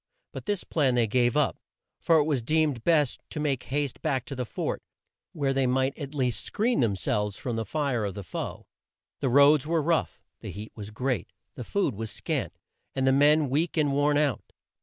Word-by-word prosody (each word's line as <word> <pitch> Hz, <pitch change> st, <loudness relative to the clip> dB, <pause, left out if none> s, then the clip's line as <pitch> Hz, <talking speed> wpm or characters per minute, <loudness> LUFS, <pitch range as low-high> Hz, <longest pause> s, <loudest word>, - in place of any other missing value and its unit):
But -, -, -8 dB
this 205 Hz, -3 st, 0 dB
plan 135 Hz, -6 st, +1 dB
they 120 Hz, -2 st, +3 dB
gave 120 Hz, +3 st, +2 dB
up, 150 Hz, -, +1 dB, 0.4 s
for 165 Hz, -, +4 dB
it 150 Hz, -, +4 dB
was 145 Hz, -4 st, 0 dB
deemed 150 Hz, -2 st, +1 dB
best 150 Hz, -6 st, +2 dB
to 150 Hz, -, -5 dB
make 140 Hz, -4 st, 0 dB
haste 145 Hz, -1 st, -2 dB
back 135 Hz, -6 st, -1 dB
to 140 Hz, -, -6 dB
the 125 Hz, -1 st, -3 dB
fort, -, -, -3 dB, 0.5 s
where 140 Hz, -4 st, 0 dB
they 135 Hz, -1 st, +2 dB
might 130 Hz, +2 st, +1 dB
at 145 Hz, -1 st, -7 dB
least 125 Hz, -6 st, 0 dB
screen 235 Hz, +4 st, 0 dB
them 110 Hz, -5 st, +2 dB
selves 105 Hz, +2 st, -1 dB
from 120 Hz, -3 st, -3 dB
the 115 Hz, 0 st, -2 dB
fire 140 Hz, -2 st, -1 dB
of 100 Hz, -2 st, -3 dB
the 100 Hz, -, -6 dB
foe. 85 Hz, -, -6 dB, 0.5 s
The 135 Hz, -, 0 dB
roads 145 Hz, +2 st, +5 dB
were 165 Hz, -1 st, +1 dB
rough; 165 Hz, +1 st, 0 dB, 0.2 s
the -, -, -7 dB
heat 105 Hz, +2 st, -7 dB
was 105 Hz, -2 st, -7 dB
great; 125 Hz, -2 st, -2 dB, 0.2 s
the 125 Hz, -, -7 dB
food 190 Hz, -, 0 dB
was 110 Hz, +2 st, -5 dB
scant, -, -, -3 dB, 0.4 s
and 135 Hz, -, +1 dB
the 135 Hz, -, +5 dB
men 145 Hz, +2 st, +5 dB
weak 155 Hz, +6 st, 0 dB
and 150 Hz, -2 st, +3 dB
worn 145 Hz, +1 st, +2 dB
out. 145 Hz, -5 st, -1 dB
135 Hz, 205 wpm, -27 LUFS, 120-150 Hz, 0.5 s, roads